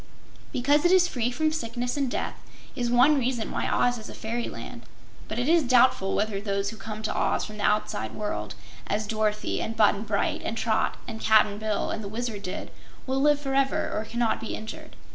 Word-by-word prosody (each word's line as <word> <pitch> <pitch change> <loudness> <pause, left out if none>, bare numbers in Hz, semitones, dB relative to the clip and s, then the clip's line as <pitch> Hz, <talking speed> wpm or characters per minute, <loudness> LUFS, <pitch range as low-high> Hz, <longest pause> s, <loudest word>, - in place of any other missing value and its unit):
Because 285 +4 +2
it 350 - +4
is 370 -1 +6
free 245 -7 -1
from 310 +5 0
sickness 245 -4 -3
and 280 -3 0
death - - -2 0.4
is 245 -3 -1
one 255 +5 +5
reason 245 -3 -1
why - - -1
Oz 245 -1 +2
is 215 - -9
a - - -9
fairyland, 230 +2 -5 0.5
but 215 - -5
it 245 +2 0
is 335 +1 +5
doubtful 250 -7 +4
whether 205 -1 0
those 200 0 -1
who - - -9
come 215 +1 -7
to 215 - -2
Oz - - +1
from 215 -1 -9
the - - -3
outside 210 - 0
world, 210 -1 -4 0.3
as 215 +1 -1
Dorothy 215 0 -1
and 225 0 -4
Button 210 -1 +4
Bright 210 -2 -1
and 225 - -3
Trot 220 -2 +1
and 225 -2 -6
Cap'n 210 -1 +4
Bill 215 -1 -1
and 220 - -4
the - - -5
Wizard 225 -1 -4
did, 185 -2 -5 0.3
will 265 +1 0
live 295 0 +4
forever 270 -1 0
or 215 - -2
cannot 235 -1 0
be 225 - -4
injured. 310 +9 -8
225 Hz, 200 wpm, -27 LUFS, 215-260 Hz, 0.5 s, is